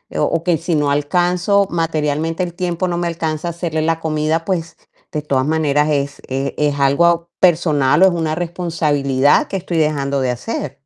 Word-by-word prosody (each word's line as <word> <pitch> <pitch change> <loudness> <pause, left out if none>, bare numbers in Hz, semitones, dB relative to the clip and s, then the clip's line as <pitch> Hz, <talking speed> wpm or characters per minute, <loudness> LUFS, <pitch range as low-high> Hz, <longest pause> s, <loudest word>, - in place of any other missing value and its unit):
O - - 0
o 165 +2 0
que 175 -2 +2
si 165 0 -2
no 145 -1 +1
alcanzo, 180 +7 +1
materialmente 165 0 -1
el 175 -1 -5
tiempo 180 0 -2
no 175 -1 -2
me 175 0 -1
alcanza 160 -1 -3
a - - -1
hacerle 165 -2 -3
la 165 +1 0
comida, 155 +1 -1
pues 170 -3 -3 0.3
de 150 - -2
todas 135 -3 0
maneras 150 -1 +1
es 140 -1 -1
es 135 +1 -2
es 145 -1 0
algo 170 +5 +2
personal 160 -3 +3
o - - +9
es - - +3
una 160 -2 -1
responsabilidad 155 -6 +1
que 195 - -3
estoy 175 -2 -4
dejando 140 -3 0
de 125 -1 0
hacer. 135 - -5
160 Hz, 190 wpm, -18 LUFS, 145-170 Hz, 0.3 s, o